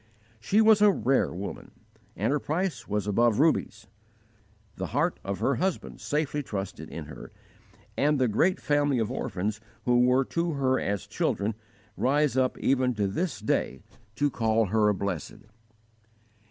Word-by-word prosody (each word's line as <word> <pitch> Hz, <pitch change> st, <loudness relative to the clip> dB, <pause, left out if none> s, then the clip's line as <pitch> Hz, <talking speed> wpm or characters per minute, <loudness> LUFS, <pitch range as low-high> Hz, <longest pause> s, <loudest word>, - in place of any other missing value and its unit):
She 200 Hz, -, +2 dB
was 220 Hz, -1 st, +5 dB
a 210 Hz, -, +7 dB
rare 135 Hz, -8 st, +1 dB
woman 95 Hz, +3 st, -7 dB, 0.5 s
and 110 Hz, +8 st, 0 dB
her 150 Hz, -, +1 dB
price 155 Hz, -7 st, -2 dB
was 105 Hz, -1 st, -1 dB
above 110 Hz, +2 st, +2 dB
rubies. 155 Hz, -6 st, +1 dB, 0.9 s
The -, -, -3 dB
heart -, -, +1 dB
of 100 Hz, 0 st, -3 dB
her 130 Hz, +2 st, +1 dB
husband 190 Hz, +6 st, -3 dB
safely 150 Hz, -1 st, -1 dB
trusted, 100 Hz, -7 st, -6 dB
in -, -, -7 dB
her, -, -, -10 dB, 0.6 s
and 150 Hz, +1 st, +2 dB
the 130 Hz, -2 st, +2 dB
great 165 Hz, -, +2 dB
family 145 Hz, -2 st, +1 dB
of 115 Hz, 0 st, -1 dB
orphans 105 Hz, -3 st, -3 dB, 0.2 s
who 120 Hz, 0 st, +3 dB
were 125 Hz, +2 st, +4 dB
to 170 Hz, +2 st, -1 dB
her 130 Hz, -2 st, +1 dB
as 100 Hz, -2 st, -2 dB
children 105 Hz, +2 st, -1 dB, 0.4 s
rise 145 Hz, +1 st, +1 dB
up 130 Hz, -1 st, +1 dB
even 130 Hz, -2 st, +1 dB
to 105 Hz, -1 st, 0 dB
this 160 Hz, -, -2 dB
day 85 Hz, -10 st, -1 dB, 0.3 s
to 145 Hz, +3 st, +1 dB
call 115 Hz, -1 st, +1 dB
her 105 Hz, +1 st, +3 dB
blessed. 95 Hz, -6 st, -4 dB
125 Hz, 155 wpm, -27 LUFS, 105-145 Hz, 0.9 s, a